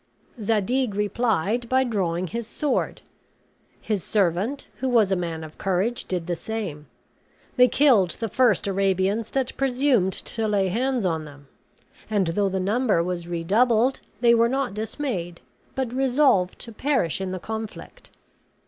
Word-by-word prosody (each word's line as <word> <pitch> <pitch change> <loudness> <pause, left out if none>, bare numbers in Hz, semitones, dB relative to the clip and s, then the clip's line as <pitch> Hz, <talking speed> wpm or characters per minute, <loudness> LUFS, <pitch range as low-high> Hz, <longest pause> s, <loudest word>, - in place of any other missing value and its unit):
Zadig 220 +2 0
replied 215 +1 0
by 260 0 +3
drawing 185 -7 -1
his 230 +4 -5
sword; 295 +1 -2 0.8
his 210 -4 -2
servant, 205 +7 0
who 260 +1 -1
was 225 -5 +3
a - - +3
man 165 -3 -3
of 155 -1 -11
courage, 195 +5 -1
did 180 -3 -3
the 175 0 -2
same. 170 -6 -5 0.7
They 250 -1 +6
killed 245 -11 +4
the 225 - -1
first 230 -2 +2
Arabians 195 +2 0
that 265 -2 -2
presumed 255 -7 +2
to 225 +3 -2
lay 200 -3 +1
hands 245 +2 0
on 160 -3 -1
them; 145 -1 -14 0.6
and, 205 -3 +2
though 195 +4 +1
the 190 0 -2
number 205 -1 +1
was 175 -1 -4
redoubled, 220 +9 +2 0.2
they 235 -1 +6
were 230 0 +4
not 265 -5 -1
dismayed, 215 - -4 0.4
but 260 -3 -2
resolved 260 -8 +2
to 230 - -6
perish 230 - 0
in 190 - -2
the 185 - -3
conflict. 220 +3 -7
210 Hz, 150 wpm, -24 LUFS, 185-245 Hz, 0.8 s, They